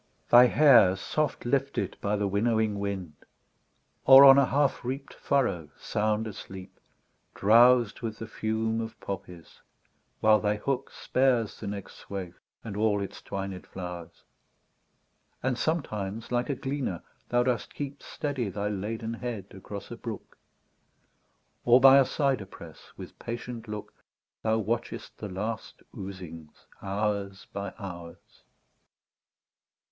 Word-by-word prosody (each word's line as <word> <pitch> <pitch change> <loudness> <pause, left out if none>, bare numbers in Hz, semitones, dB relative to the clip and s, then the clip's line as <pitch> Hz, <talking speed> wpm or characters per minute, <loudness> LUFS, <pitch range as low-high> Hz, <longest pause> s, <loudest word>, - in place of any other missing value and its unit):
Thy 120 +1 +9
hair 120 -10 +6
soft 150 +10 -2
lifted 140 +2 0
by 105 +1 0
the 100 -1 0
winnowing 110 +1 +1
wind; 95 -5 -4 0.9
Or 135 +1 +10
on 135 0 +9
a 140 - +4
half 145 -1 +1
reap'd 135 +3 -5
furrow 100 - 0
sound 110 +1 -1
asleep, 95 -3 -9 0.6
Drows'd 120 +2 +5
with 110 -2 -4
the 115 - -6
fume 110 +1 -2
of 115 0 -7
poppies, 90 -3 -8 0.6
while 110 0 +5
thy 105 0 +1
hook 135 +5 -2
Spares 125 -4 0
the 105 - -6
next 100 -1 -6
swath 95 -3 -7 0.3
and 105 -3 -6
all 105 -1 +2
its 100 - -6
twined 95 -1 -6
flowers: 90 -2 -8 1.2
And 130 0 +1
sometimes 115 - -3
like 125 0 0
a 140 - 0
gleaner 135 - -3 0.3
thou 120 0 +3
dost 125 -2 -2
keep 140 -1 -6
Steady 135 -7 -3
thy 100 +2 -3
laden 110 +3 -4
head 115 -5 -6
across 100 +3 -9
a 120 - -6
brook; 115 -2 -8 1.3
Or 120 +1 +6
by 135 +1 +8
a 135 - +5
cyder 135 -8 0
press, - - -13
with - - -10
patient 120 0 -6
look. 105 -1 -7 0.5
Thou 110 0 +1
watchest 110 +2 -3
the 105 - -5
last 110 +4 -5
oozings 90 -5 -9 0.2
hours 100 -1 -2
by 100 0 -4
hours. 85 -5 -10
110 Hz, 130 wpm, -28 LUFS, 100-125 Hz, 1.3 s, Or